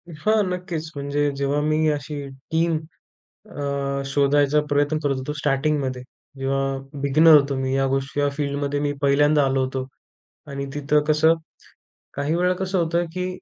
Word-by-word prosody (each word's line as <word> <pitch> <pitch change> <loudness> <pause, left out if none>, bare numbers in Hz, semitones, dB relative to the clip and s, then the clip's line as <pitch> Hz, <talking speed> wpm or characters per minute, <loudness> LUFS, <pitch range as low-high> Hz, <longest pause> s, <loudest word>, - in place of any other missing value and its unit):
हां, 215 +7 +2
नक्कीच, 175 -3 -4
म्हणजे 145 +1 0
जेव्हा 140 +1 0
मी 155 +1 +1
अशी 145 0 -4 0.3
टीम, 165 0 +2 0.7
अ, 140 -1 -2
शोधायचा 145 +1 +3
प्रयत्न 145 +2 +2
करत 140 -2 0
होतो, 130 +3 -4
स्टार्टिंगमध्ये. 135 -3 0 0.4
जेव्हा 135 0 0 0.4
बिगिनर 155 +3 +6
होतो, 140 -1 +2
मी 130 0 -1
या 135 0 +2
गोष्टी, 135 +1 -1
या 145 - +2
फील्डमध्ये, 140 0 -2
मी 145 0 0
पहिल्यांदा 145 +1 +4
आलो 135 0 +1
होतो. 130 0 -4 0.6
आणि 140 -1 -5
तिथं 150 +1 +2
कसं, 155 +2 +4 0.8
काही 145 +3 -1
वेळा 180 +1 +2
कसं 190 0 -2
होतं, 170 +1 0
की 180 0 -2
145 Hz, 150 wpm, -23 LUFS, 140-155 Hz, 0.8 s, बिगिनर